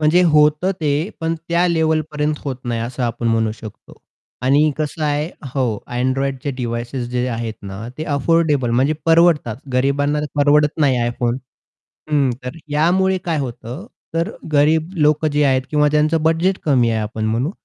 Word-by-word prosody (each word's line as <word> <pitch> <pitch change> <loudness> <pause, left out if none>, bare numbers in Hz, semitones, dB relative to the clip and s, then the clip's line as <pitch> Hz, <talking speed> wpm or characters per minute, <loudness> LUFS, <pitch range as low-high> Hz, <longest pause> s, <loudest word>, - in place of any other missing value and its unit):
म्हणजे 155 +4 +4
होतं, 155 +2 +4
ते 150 +3 0
पण 165 0 0
त्या 170 +1 +2
लेव्हलपर्यंत 155 -2 0
होत 135 -3 -3
नाही, 115 -1 -2
असं 125 +2 -4
आपण 120 0 -2
म्हणू 115 -1 +1
शकतो. 110 -2 -12 0.4
आणि 145 +4 +4
कसं 155 +1 -3
आहे 150 +1 0 0.3
हो, 120 -6 -1
Androidचे 135 +2 -1
डिव्हाइसेस 120 +1 -3
जे 125 0 -1
आहेत 115 -2 -3
ना, 100 +4 -7
ते 155 - -3
अफोर्डेबल, 145 -4 +2
म्हणजे 135 +6 +2
परवडतात. 165 -9 +4 0.2
गरीबांना 145 +3 +1
परवडत 150 +1 +3
नाही 135 -3 +3
iPhone. 120 0 -1 0.7
हं. 140 -4 +2
तर 125 +6 -6 0.2
यामुळे 185 +5 +2
काय 165 -3 -1
होतं, 125 - -6 0.3
तर 165 +1 0 0.2
गरीब 155 +4 +3
लोकं 150 +1 +3
जे 145 0 +2
आहेत 130 -1 +2
किंवा 150 -1 +3
त्यांचं 155 +1 +2
बजेट 165 +4 +2
कमी 125 -6 +3
आहे, 110 - 0
आपण 110 +1 -4
म्हणू, 115 +7 0
145 Hz, 155 wpm, -19 LUFS, 125-155 Hz, 0.7 s, म्हणजे